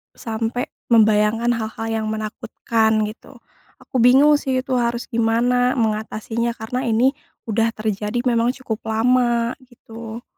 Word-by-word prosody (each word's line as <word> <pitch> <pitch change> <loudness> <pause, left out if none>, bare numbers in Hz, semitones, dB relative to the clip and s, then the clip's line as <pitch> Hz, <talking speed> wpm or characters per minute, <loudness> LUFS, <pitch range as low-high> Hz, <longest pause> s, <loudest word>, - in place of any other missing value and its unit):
sampai 225 +2 -3 0.2
membayangkan 220 +1 +3
hal-hal 225 -1 -3
yang 220 -1 -1
menakutkan 220 0 -1
gitu. 215 +5 -8 0.5
Aku 255 - -3
bingung 280 +5 +6
sih 260 -1 -1
itu 260 - -4
harus 235 0 -1
gimana 240 +2 +2
mengatasinya 225 +1 -2
karena 245 +3 -4
ini 235 +4 +3 0.3
udah 225 0 +1
terjadi 215 +2 -2
memang 240 0 +1
cukup 220 -3 -3
lama 235 +1 +2 0.2
gitu. 230 -1 -10
230 Hz, 120 wpm, -21 LUFS, 220-245 Hz, 0.5 s, bingung